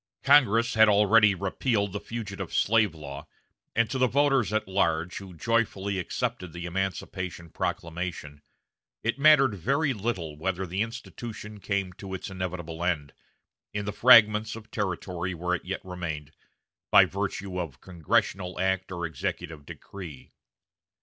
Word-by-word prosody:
Congress 120 -5 +5
had 110 -1 +6
already 105 0 +5
repealed 100 +2 -1
the 105 - -2
fugitive 105 -4 -6
slave 110 -5 +3
law, 70 -3 -8 0.5
and 115 0 +3
to 130 +3 -3
the 130 - +4
voters 135 -5 +2
at 110 -1 0
large, 85 -2 0
who 95 -2 -10
joyfully 100 -1 0
accepted 90 0 -3
the 85 0 -6
emancipation 90 -1 -4
proclamation, 85 -4 -4 0.6
it 120 +4 -1
mattered 140 -5 +6
very 135 - 0
little 95 -8 -3
whether 95 +4 -2
the 95 +3 -2
"institution" 115 -2 -6
came 100 -2 -2
to 95 +1 -7
its 95 - -7
inevitable 85 -3 -5
end, 75 -5 -1 0.6
in 105 0 -2
the 105 - -3
fragments 110 -2 +6
of 110 0 -12
territory 90 -2 -3
where 90 +2 -2
it 90 - -2
yet 95 +1 -5
remained, 85 -5 -5 0.6
by - - +8
virtue 95 -1 -3
of 75 -8 -5
congressional 90 +2 -1
act 95 0 0
or 85 -2 -3
executive 80 -1 -5
decree. 85 -9 -10
95 Hz, 140 wpm, -27 LUFS, 85-110 Hz, 0.6 s, by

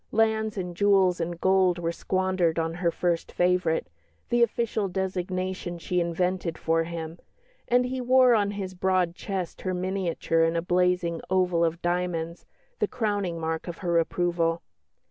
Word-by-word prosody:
Lands 220 -1 +1
and 180 -2 -4
jewels 190 -2 +3
and 170 0 -3
gold 190 -1 +3
were 170 -1 -1
squandered 185 -2 0
on 165 0 0
her 175 0 0
"First 170 0 -1
Favourite" 180 -2 +1 0.4
the 240 0 +2
official 230 -3 +1
designation 185 -1 -3
she 180 +1 -1
invented 170 0 -1
for 165 0 +1
him; 165 0 -6 0.5
and 250 +1 +3
he 255 +1 -3
wore 255 0 +5
on 205 -3 +2
his 195 -2 -5
broad 185 -1 +1
chest 185 -1 -5
her 185 -1 -2
miniature 180 -3 0
in 165 +1 +1
a 165 - +1
blazing 180 -1 +1
oval 180 -2 +2
of 165 +1 -1
diamonds, 175 -1 -2 0.3
the - - +2
crowning 205 -8 -2
mark 160 +1 -3
of 175 - -5
her 170 -1 +3
approval. 170 0 0
180 Hz, 155 wpm, -26 LUFS, 170-190 Hz, 0.5 s, wore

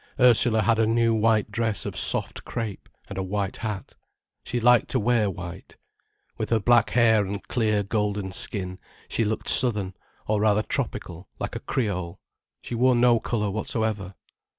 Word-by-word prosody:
Ursula 120 -3 +5
had 115 +2 +2
a 110 - +3
new 115 0 +2
white 110 -1 +1
dress 110 -2 -1
of - - -5
soft - - +1
crepe, 110 -5 -6 0.2
and 100 - -6
a - - -1
white 100 +1 -3
hat. 105 -4 -5 0.5
She 120 - -3
liked 120 0 +4
to 130 - +1
wear 115 -2 +2
white. 85 -1 -9 0.6
With - - -3
her 115 - +2
black 120 +1 +3
hair 110 -3 +4
and 100 +1 -6
clear 110 -4 0
golden 105 -2 -2
skin, 95 -1 -3 0.3
she 115 - 0
looked 110 0 -3
southern, 105 -7 +4 0.3
or 105 -1 0
rather 105 0 +2
tropical, 85 -3 -4
like - - -5
a - - -3
Creole. 90 -7 -3 0.4
She - - -7
wore 125 +2 +3
no 120 -1 +4
colour 105 -3 -2
whatsoever. 105 -2 -3
110 Hz, 165 wpm, -25 LUFS, 100-115 Hz, 0.6 s, Ursula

